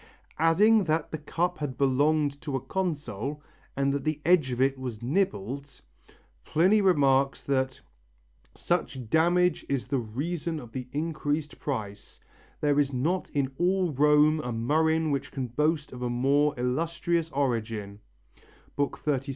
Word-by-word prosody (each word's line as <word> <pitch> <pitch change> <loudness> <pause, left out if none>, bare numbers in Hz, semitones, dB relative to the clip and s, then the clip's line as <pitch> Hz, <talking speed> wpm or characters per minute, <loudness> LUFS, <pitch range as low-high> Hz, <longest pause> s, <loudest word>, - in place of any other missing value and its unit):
Adding 200 +6 +4
that 160 -1 0
the 155 - -4
cup 175 +4 -2
had 145 -4 -4
belonged 145 +1 +2
to 150 -4 -4
a - - 0
consul, 150 - -3 0.3
and 140 0 +1
that 140 -1 -2
the 155 0 -1
edge 170 -5 +4
of 125 -1 -3
it 135 +1 +3
was 120 -4 -6
nibbled, 140 - -2 0.6
Pliny 190 +7 +3
remarks 140 -7 +3
that 130 -1 -1 0.8
"such 125 -3 -2
damage 175 +1 +3
is 140 -3 -1
the 140 - +1
reason 155 +8 -3
of 120 -4 -11
the 125 0 -6
increased 150 0 -2
price, 105 -8 -5 0.4
there 145 -1 +2
is 140 -1 +2
not 155 +9 -1
in 140 -2 -1
all 180 0 +2
Rome 150 +2 +4
a 125 -5 -4
murrhine 155 +7 +1
which 140 - -2
can 135 -2 -3
boast 150 +4 0
of 125 - -8
a 125 - -1
more 140 +4 +2
illustrious 165 +6 -1
origin" 115 -7 -2 0.8
(XXXVII, 145 - -1
7). 145 -4 +1
145 Hz, 145 wpm, -27 LUFS, 130-160 Hz, 0.8 s, Adding